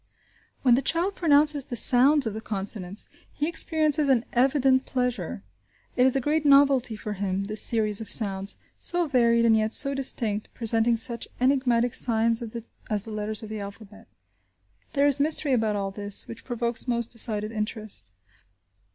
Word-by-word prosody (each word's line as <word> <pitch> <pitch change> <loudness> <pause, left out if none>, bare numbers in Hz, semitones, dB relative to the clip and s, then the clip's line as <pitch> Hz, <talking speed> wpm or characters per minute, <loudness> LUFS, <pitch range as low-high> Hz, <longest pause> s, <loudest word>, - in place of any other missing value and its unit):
When 250 -3 +4
the 250 - +2
child 345 +7 -1
pronounces 295 -4 +2
the 245 - -6
sounds 265 +5 +4
of 220 - -3
the 220 - -7
consonants, 200 -2 -3 0.3
he 295 - -3
experiences 310 -3 +3
an 250 -3 +2
evident 260 +1 +2
pleasure. 245 - -3 0.5
It 250 +1 +3
is 265 - 0
a - - +2
great 300 +4 -1
novelty 275 -4 +3
for 210 0 -6
him, 195 -1 -3
this 210 +2 0
series 215 -3 +2
of 220 - -8
sounds, 195 -3 +2 0.2
so 350 -1 +1
varied 235 -4 +2
and 225 -1 +4
yet 215 0 0
so 275 0 +4
distinct, 230 -6 -2
presenting 230 0 0
such 235 0 -2
enigmatic 245 -2 +1
signs 230 0 +1 0.5
as 210 -2 +1
the 225 - -9
letters 215 +1 -4
of 215 - -9
the 215 0 -6
alphabet. 210 +2 -11 0.9
There 280 0 +2
is 285 -1 +2
mystery 295 -1 +2
about 220 -3 0
all 195 -1 -3
this, 205 0 -2
which 230 - -10
provokes 240 0 -2
most 235 -2 -2
decided 215 -2 0
interest. 215 - -5
235 Hz, 165 wpm, -25 LUFS, 215-270 Hz, 0.9 s, When